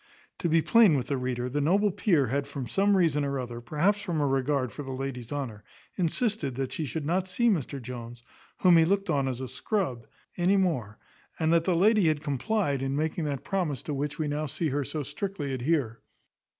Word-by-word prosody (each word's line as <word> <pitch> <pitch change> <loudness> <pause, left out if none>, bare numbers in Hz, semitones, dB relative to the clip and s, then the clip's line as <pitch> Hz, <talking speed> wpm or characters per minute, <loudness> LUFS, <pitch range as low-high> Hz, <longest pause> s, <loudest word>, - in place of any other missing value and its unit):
To 170 - 0
be 160 0 +3
plain 220 -10 +6
with 125 - -2
the 140 - 0
reader, 125 -1 -2
the 145 +4 -1
noble 195 +7 +3
peer 170 -7 +2
had 140 +2 -1
from 140 -3 -5
some 195 - +3
reason 155 -5 +2
or 140 -1 -1
other, 120 -2 -5
perhaps 170 - +1
from 175 -6 -2
a 145 - +2
regard 135 -2 0
for 145 - -7
the 135 -2 -6
lady's 130 -3 -5
honour, 130 -8 -4 0.3
insisted 180 - 0
that 135 0 -3
she 160 - -3
should 145 +3 -4
not 180 +4 0
see 235 +6 +2
Mr 145 - -1
Jones, 120 -1 -8 0.4
whom 180 -2 +7
he 165 - +6
looked 195 +1 +1
on 140 -3 +1
as 130 -1 -3
a 130 - -4
scrub, 130 - -2 0.3
any 185 +3 +3
more; 130 - 0 0.4
and 160 0 +2
the 170 +2 +3
lady 205 +1 +4
had 155 -1 +1
complied 145 - 0
in 135 0 -1
making 155 +2 -1
that 140 -3 -3
promise 175 -10 -2
to 150 - -4
which 145 +1 -3
we 155 - -1
now 150 +1 -2
see 160 +3 -1
her 145 +1 -1
so 150 +2 -4
strictly 145 0 -4
adhere. 130 -3 -1
145 Hz, 210 wpm, -28 LUFS, 130-175 Hz, 0.4 s, whom